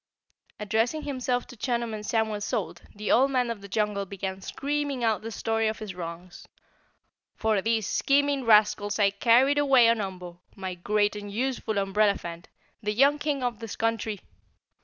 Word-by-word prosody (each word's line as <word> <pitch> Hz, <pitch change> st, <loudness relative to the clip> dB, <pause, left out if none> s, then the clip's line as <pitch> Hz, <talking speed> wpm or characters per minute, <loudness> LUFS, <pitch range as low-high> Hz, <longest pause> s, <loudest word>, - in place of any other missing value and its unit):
Addressing 225 Hz, +8 st, 0 dB
himself 255 Hz, -3 st, -2 dB
to -, -, -13 dB
Chunum 235 Hz, -1 st, -2 dB
and 210 Hz, -1 st, -5 dB
Samuel 220 Hz, -1 st, -1 dB
Salt, -, -, -3 dB
the 210 Hz, +1 st, -2 dB
Old 265 Hz, +3 st, +5 dB
Man 250 Hz, -3 st, +1 dB
of 220 Hz, -3 st, -6 dB
the 200 Hz, -, -9 dB
Jungle 205 Hz, -1 st, -1 dB
began 190 Hz, 0 st, -5 dB
screaming 285 Hz, +2 st, -2 dB
out 220 Hz, -4 st, +1 dB
the 225 Hz, -, -6 dB
story 225 Hz, 0 st, -1 dB
of 215 Hz, -, -2 dB
his 215 Hz, -3 st, -7 dB
wrongs. 175 Hz, 0 st, -8 dB, 0.9 s
"For 220 Hz, -3 st, +1 dB
these 225 Hz, 0 st, 0 dB
scheming 280 Hz, +3 st, +1 dB
rascals 210 Hz, -2 st, +4 dB
I 200 Hz, -2 st, +3 dB
carried 245 Hz, +7 st, +4 dB
away 270 Hz, -5 st, +5 dB
on 230 Hz, -2 st, +2 dB
Umbo, 180 Hz, -3 st, -7 dB, 0.2 s
my 190 Hz, -1 st, -5 dB
great 205 Hz, +4 st, 0 dB
and 205 Hz, -1 st, -7 dB
useful 235 Hz, -1 st, -2 dB
umbrellaphant, 195 Hz, -4 st, 0 dB, 0.4 s
the 210 Hz, -1 st, -1 dB
young 280 Hz, +6 st, +4 dB
King 290 Hz, -3 st, -1 dB
of 245 Hz, -3 st, -2 dB
this 225 Hz, -2 st, -6 dB
country. 225 Hz, -3 st, -2 dB
220 Hz, 165 wpm, -27 LUFS, 200-245 Hz, 0.9 s, Old